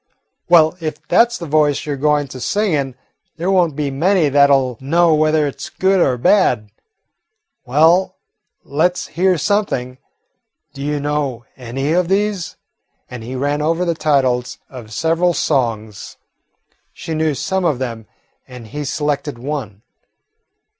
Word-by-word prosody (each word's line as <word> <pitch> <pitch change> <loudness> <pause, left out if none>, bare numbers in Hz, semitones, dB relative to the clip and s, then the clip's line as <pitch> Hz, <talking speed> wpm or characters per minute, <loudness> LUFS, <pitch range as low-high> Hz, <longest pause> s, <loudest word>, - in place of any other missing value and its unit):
"Well, 165 -1 +5
if 155 -1 -6
that 235 +7 +4
's 235 - -4
the 170 - -7
voice 150 -2 +1
you 150 - -2
're - - -2
going 145 +1 +1
to 130 - -8
sing 205 - 0
in, 135 -4 -1 0.4
there 175 +4 -1
won't 175 -6 +2
be 145 -1 -2
many 165 +3 +2
that 140 0 +5
'll 130 -4 +1
know 165 +4 +3
whether 155 0 +2
it 140 - -5
's - - -6
good 190 0 +1
or 130 -7 +2
bad. 120 - +2 1.0
Well, 160 +8 +3 0.5
let 175 +5 0
's 175 - -6
hear 180 +2 +2
something. 145 -9 -1 0.7
Do 140 - -9
you 145 +1 -2
know 140 -5 -2
any 135 +4 -3
of 180 0 +2
these?" 200 -1 -1 0.6
And 125 -2 -7
he 125 +3 -6
ran 145 +3 -1
over 165 +3 0
the 170 - +1
titles 130 -6 0
of 120 -5 -10
several 165 +6 +1
songs. 110 -7 -2 0.7
She 165 - -7
knew 155 -2 0
some 190 +6 -2
of 155 -7 +1
them, 115 -4 -5 0.4
and 125 -2 -11
he 150 +4 -5
selected 145 -2 -2
one. 120 -6 -6
150 Hz, 155 wpm, -18 LUFS, 130-170 Hz, 1.0 s, Well